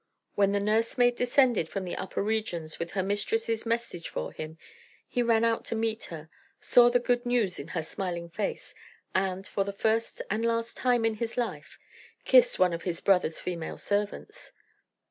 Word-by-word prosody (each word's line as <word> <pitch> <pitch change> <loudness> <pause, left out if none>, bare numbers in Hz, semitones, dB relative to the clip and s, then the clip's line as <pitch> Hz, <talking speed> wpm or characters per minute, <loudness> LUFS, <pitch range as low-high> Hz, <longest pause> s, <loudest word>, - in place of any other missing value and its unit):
When 200 -1 +3
the 200 - +1
nursemaid 230 +4 +2
descended 245 - +3
from 195 -2 -4
the 175 - -4
upper 190 - -3
regions 200 -7 -2
with 170 - -3
her 190 -1 0
mistress's 445 - -1
message 230 -7 -2
for - - -4
him, 155 +1 -7 0.5
he 245 - 0
ran 230 -1 +3
out 230 0 +2
to - - -1
meet 225 0 -1
her; 160 -3 -8 0.3
saw 240 -1 +6
the 245 - +4
good 245 0 +1
news 240 -7 +1
in 140 - -7
her 165 -1 -3
smiling 170 0 -4
face; 195 +4 -4 0.4
and, 190 0 0
for 200 - -1
the 200 - -4
first 220 +3 0
and 215 +3 -1
last 230 0 0
time 245 -3 +2
in 225 - +2
his 225 +2 -4
life 245 - -3 0.5
kissed - - +6
one 180 -2 +4
of 170 - -3
his 170 -2 -3
brother's 180 -5 +2
female 170 -3 -4
servants. 205 0 -3
215 Hz, 180 wpm, -28 LUFS, 180-235 Hz, 0.5 s, saw